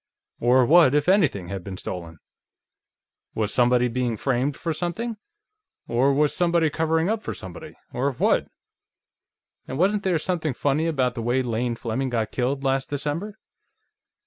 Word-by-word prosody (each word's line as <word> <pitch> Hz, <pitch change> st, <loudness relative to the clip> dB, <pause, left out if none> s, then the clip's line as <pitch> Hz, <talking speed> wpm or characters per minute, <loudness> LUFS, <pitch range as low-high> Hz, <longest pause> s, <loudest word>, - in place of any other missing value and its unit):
Or 125 Hz, +1 st, +4 dB
what, 155 Hz, -1 st, +6 dB
if 150 Hz, +1 st, +1 dB
anything, 155 Hz, -, +2 dB
had 95 Hz, -2 st, -5 dB
been 95 Hz, -1 st, -7 dB
stolen? 85 Hz, -3 st, -6 dB, 1.2 s
Was 110 Hz, -2 st, -1 dB
somebody 125 Hz, 0 st, +3 dB
being 120 Hz, -1 st, -1 dB
framed 135 Hz, +4 st, 0 dB
for 165 Hz, -, -2 dB
something... 200 Hz, +9 st, -3 dB, 0.7 s
or 125 Hz, +4 st, +2 dB
was 145 Hz, +1 st, +2 dB
somebody 170 Hz, -3 st, +2 dB
covering 160 Hz, +1 st, +1 dB
up 220 Hz, +1 st, 0 dB
for -, -, -5 dB
somebody... 95 Hz, -2 st, -9 dB, 0.2 s
or 135 Hz, +3 st, 0 dB
what? -, -, +1 dB, 1.2 s
And 130 Hz, -, -5 dB
wasn't 200 Hz, +5 st, +2 dB
there 185 Hz, -4 st, +1 dB
something 160 Hz, -4 st, -2 dB
funny 145 Hz, +5 st, 0 dB
about 130 Hz, -6 st, +1 dB
the 120 Hz, -, -5 dB
way 120 Hz, +3 st, +1 dB
Lane 120 Hz, 0 st, -1 dB
Fleming 120 Hz, +3 st, -2 dB
got 115 Hz, -3 st, -1 dB
killed, 135 Hz, +2 st, -1 dB
last 135 Hz, 0 st, 0 dB
December? 150 Hz, +9 st, -3 dB
135 Hz, 150 wpm, -24 LUFS, 120-165 Hz, 1.2 s, what